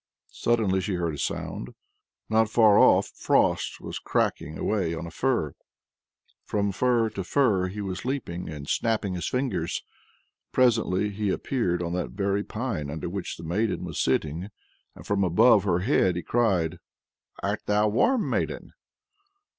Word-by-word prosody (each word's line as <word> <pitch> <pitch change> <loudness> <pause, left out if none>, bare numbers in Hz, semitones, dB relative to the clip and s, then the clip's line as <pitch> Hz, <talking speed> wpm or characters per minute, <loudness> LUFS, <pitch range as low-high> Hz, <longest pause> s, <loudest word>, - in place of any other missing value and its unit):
Suddenly 105 -5 +1
she 95 0 -2
heard 85 -3 -1
a - - -6
sound. - - -4 0.5
Not 110 0 +2
far 110 -3 +5
off, - - +5
Frost - - +1
was - - -6
cracking 75 +2 -1
away 95 -6 0
on 85 - -5
a 85 - -8
fir. 120 - 0 0.9
From 100 -1 -1
fir 115 +1 +2
to 100 -2 -4
fir 95 -5 +2
was 95 -2 -4
he 125 - -3
leaping, 90 - -4
and 75 -2 -7
snapping 110 -2 0
his 90 -2 -3
fingers. 125 -10 -2 0.7
Presently 110 -5 +2
he 100 0 -2
appeared 95 -5 -1
on 85 0 -3
that 90 -1 -3
very 100 0 0
pine 105 - -4
under 80 +3 -4
which 95 +1 -5
the 85 - -10
maiden 100 +7 -1
was - - -5
sitting 80 +8 0 0.5
and - - -12
from 100 -1 +1
above 95 +4 +5
her 85 +1 +1
head 95 - +2
he 90 - -3
cried: 90 -8 +1 0.6
"Art - - -1
thou 105 +1 +3
warm, 225 - +2
maiden?" - - -2
100 Hz, 155 wpm, -26 LUFS, 85-110 Hz, 0.9 s, far